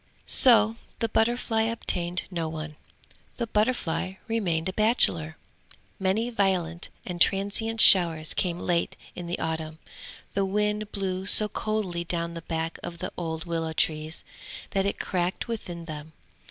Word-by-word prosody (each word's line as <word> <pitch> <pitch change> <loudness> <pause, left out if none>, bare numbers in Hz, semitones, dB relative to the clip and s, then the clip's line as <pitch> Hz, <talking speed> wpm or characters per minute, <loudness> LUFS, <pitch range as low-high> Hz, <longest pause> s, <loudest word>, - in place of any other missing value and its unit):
So 225 -3 +7 0.2
the 230 - -1
butterfly 225 0 +1
obtained 180 -6 -1
no 165 -3 -2
one. 155 -1 -6 0.6
The 235 - -1
butterfly 210 -5 -1
remained 180 -7 -1
a 190 - -3
bachelor. 175 -8 +2 0.6
Many 205 +5 0
violent 185 -5 -1 0.2
and 175 -2 -6
transient 205 +3 +1
showers 165 -6 +5
came 175 -2 -1
late 175 -1 -1 0.2
in 175 -1 -7
the 175 - -2
autumn; 160 -1 -4 0.6
the 200 - +1
wind 210 +2 -1
blew 190 -1 -3
so 215 +1 +8
coldly 210 -5 -2
down 170 0 -3
the 165 - -7
back 165 0 -4
of 170 - -7
the - - -5
old 160 -1 -4
willow 165 -2 -3
trees, 155 0 -2 0.5
that 195 0 +1
it - - -2
cracked 180 +4 -2
within 175 -7 -6
them. 155 -1 -8
180 Hz, 140 wpm, -26 LUFS, 165-210 Hz, 0.6 s, so